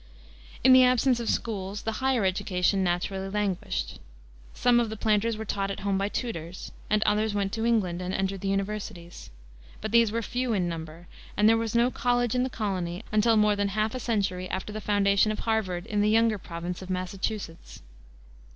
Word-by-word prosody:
In 260 +1 +7
the 255 0 +8
absence 250 0 +3
of 235 - -3
schools 205 -2 -2
the 225 - -1
higher 260 -5 +2
education 190 0 +1
naturally 190 +2 -1
languished. 180 - -2 0.6
Some 245 -1 +4
of 235 -2 0
the 220 - -6
planters 215 +1 +1
were 220 - -5
taught 195 -1 -2
at 195 - -5
home 195 -1 0
by 200 +1 0
tutors, 185 -8 -5 0.2
and 215 0 +3
others 210 0 +1
went 200 -1 0
to 225 0 -1
England 185 -7 +1
and 180 0 -3
entered 195 0 -2
the 195 - -3
universities. 195 - -4 0.5
But 215 - -5
these 230 -2 +4
were 230 +1 -2
few 245 +1 -1
in 185 -4 0
number, 165 0 -7 0.3
and 210 +1 +5
there 225 - +6
was 225 0 -2
no 240 +2 +3
college 245 -2 +1
in 250 - +1
the 260 - 0
colony 190 -4 -3
until 215 +1 +3
more 210 -1 +4
than 205 0 0
half 215 +2 -1
a 255 - -3
century 195 -6 -1
after 190 +3 -4
the 215 - -5
foundation 205 0 +2
of 215 - -3
Harvard 195 -6 -1
in 210 -1 -1
the 210 - +3
younger 225 -1 +3
province 175 +1 -6
of 185 - -9
Massachusetts. 185 - -4
205 Hz, 195 wpm, -27 LUFS, 185-225 Hz, 0.6 s, the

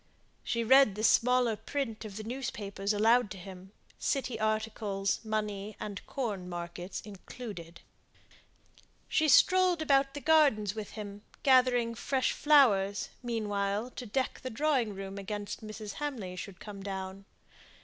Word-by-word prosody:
She 235 -1 -1
read 265 -3 +6
the 215 - -4
smaller 245 0 +4
print 225 0 -4
of 205 -2 -8
the 215 - -5
newspapers 210 -5 -3
aloud 225 +2 +4
to 190 - -7
him, 190 0 -11 0.3
city 255 -5 -1
articles, 215 -2 -1
money 210 -1 -3
and 205 -3 -6
corn 205 -9 -3
markets 175 +1 -6
included. 195 -4 -9 1.3
She 310 - +2
strolled 370 +4 +5
about 275 -3 +2
the - - -3
gardens 285 -10 +4
with 215 -1 -7
him, 205 -1 -7 0.2
gathering 250 -3 +4
fresh 260 +3 0
flowers, 210 -10 +4
meanwhile, 210 -1 -2
to 245 - -7
deck 260 +5 -1
the 255 - -4
drawing 255 -4 0
room 195 +1 -6
against 205 +1 -5
Mrs. 215 -1 -7
Hamley 230 -11 -4
should 185 0 -8
come 205 -2 -9
down. 190 0 -6
215 Hz, 135 wpm, -31 LUFS, 200-250 Hz, 1.3 s, read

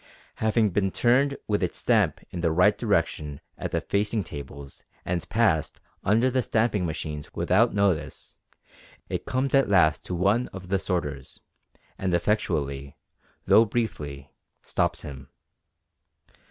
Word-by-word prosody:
Having 110 -1 +2
been 95 +1 +1
turned 130 +7 +2
with 105 -1 +1
its 90 - -1
stamp - - +2
in 90 - -4
the 85 -1 +2
right 90 +5 +4
direction 85 -9 -1 0.2
at - - -4
the - - -1
facing 105 +1 0
tables 70 -2 -9 0.2
and 85 -1 -3
passed 105 -9 +1 0.2
under 115 +6 +3
the 130 +1 +2
stamping 110 -6 +1
machines 75 -2 -5
without 110 +5 +2
notice, 90 -7 -1 0.7
it - - -4
comes 130 +1 -1
at 135 -5 +4
last 80 -7 +4
to 90 - -3
one 100 +7 +2
of 95 -1 -10
the 95 0 +1
sorters, 75 -9 -4 0.6
and 95 -2 +1
effectually, 70 -8 -1 0.5
though 110 - +7
briefly, 75 - -4 0.3
stops - - -1
him. 70 -1 -9
95 Hz, 135 wpm, -26 LUFS, 75-110 Hz, 0.7 s, though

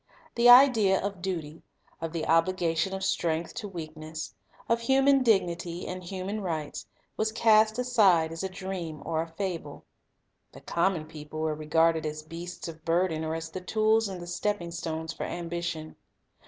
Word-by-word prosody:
The 240 0 +5
idea 245 -7 +7
of 200 -2 -4
duty, 165 -4 -4 0.4
of 165 -1 -3
the 165 -1 -3
obligation 165 +1 +2
of 190 0 -4
strength 165 -3 -1
to 215 - -5
weakness, 155 - -7 0.3
of 230 0 +2
human 270 +2 +4
dignity 175 -6 +1
and 185 0 -5
human 190 +4 -4
rights, 160 -6 -4 0.3
was 220 0 0
cast 220 -1 +4
aside 200 -10 +3
as 165 - -5
a 190 - -2
dream 185 -5 -6
or 160 0 0
a 165 - -4
fable. 165 -4 -5 0.7
The - - -12
com 180 +3 +1
mon 155 -4 -5
people 155 0 -8
were 160 -1 0
regarded 160 +1 +2
as 155 0 -5
beasts 170 +3 -7
of 160 -1 -9
burden 165 -1 +1
or 160 0 -2
as 165 0 -5
the 185 - -6
tools 215 +3 +2
and 185 -2 -6
the 175 - -7
stepping 175 0 -2
stones 160 -1 -4
for - - -5
ambition. 170 -2 -4
175 Hz, 170 wpm, -28 LUFS, 160-195 Hz, 0.7 s, idea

